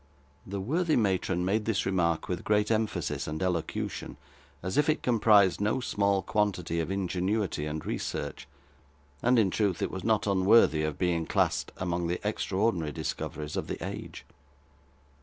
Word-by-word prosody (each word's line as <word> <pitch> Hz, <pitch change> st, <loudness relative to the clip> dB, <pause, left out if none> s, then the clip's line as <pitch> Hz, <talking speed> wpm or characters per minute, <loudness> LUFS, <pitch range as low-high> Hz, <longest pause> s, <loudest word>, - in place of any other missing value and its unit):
The 100 Hz, +1 st, -4 dB
worthy 155 Hz, -, +1 dB
matron 95 Hz, -4 st, +1 dB
made 105 Hz, +3 st, +1 dB
this 110 Hz, -3 st, 0 dB
remark 85 Hz, -4 st, +1 dB
with 90 Hz, -1 st, -3 dB
great 105 Hz, +1 st, +2 dB
emphasis 90 Hz, -10 st, -1 dB
and 75 Hz, +1 st, -3 dB
elocution, 90 Hz, -3 st, -3 dB, 0.5 s
as 95 Hz, +1 st, -3 dB
if 150 Hz, -, +3 dB
it 155 Hz, -, +1 dB
comprised 105 Hz, -6 st, +4 dB
no 110 Hz, +5 st, +1 dB
small 100 Hz, -5 st, +1 dB
quantity 90 Hz, -6 st, 0 dB
of 80 Hz, -, -2 dB
ingenuity 95 Hz, -3 st, -1 dB
and 75 Hz, 0 st, -5 dB
research; -, -, -4 dB, 0.7 s
and, 125 Hz, +1 st, +3 dB
in 100 Hz, -5 st, +3 dB
truth, 100 Hz, -4 st, 0 dB
it -, -, -1 dB
was 95 Hz, -, -5 dB
not 110 Hz, -1 st, +2 dB
unworthy 95 Hz, -5 st, +4 dB
of 75 Hz, -1 st, -2 dB
being 85 Hz, -3 st, 0 dB
classed -, -, +1 dB
among 85 Hz, -1 st, -1 dB
the 90 Hz, +1 st, -1 dB
extraordinary 95 Hz, -6 st, 0 dB
discoveries 75 Hz, +2 st, -4 dB
of -, -, -2 dB
the -, -, -4 dB
age. -, -, -7 dB
95 Hz, 155 wpm, -29 LUFS, 85-105 Hz, 0.7 s, comprised